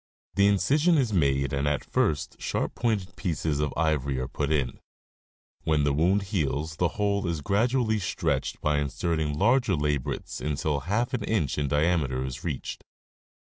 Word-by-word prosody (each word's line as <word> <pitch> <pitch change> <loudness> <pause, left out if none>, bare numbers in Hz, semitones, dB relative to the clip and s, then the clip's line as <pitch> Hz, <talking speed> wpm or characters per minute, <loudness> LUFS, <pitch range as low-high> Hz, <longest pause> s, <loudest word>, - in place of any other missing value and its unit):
* - - -77
The 100 0 +4
incision 145 - +3
is 125 -6 +1
made 70 -4 +2
and 70 +1 0
at 75 - 0
first 75 -3 -1
sharp - - -1
pointed 100 -7 -1
pieces 80 -5 -1
of 75 -2 0
ivory 75 -4 +1
are 65 0 -2
put 75 0 -2
in; 70 -5 0 0.8
when 80 -2 +2
the 70 -1 +2
wound 90 +7 +2
heals 75 -2 -1
the 90 - +3
hole 100 -2 +1
is 85 -3 -2
grad 100 - +2
ually 115 -5 +1
stretched 90 - -1
by 75 -1 +2
inserting 75 +1 -1
larger 120 - +3
labrets 75 -3 -2
until 75 0 0
half 115 +5 0
an 125 - -1
inch 80 - 0
in 70 - 0
diameter 75 -3 +1
is 65 -2 -6
reached. - - -4
80 Hz, 170 wpm, -27 LUFS, 70-100 Hz, 0.8 s, The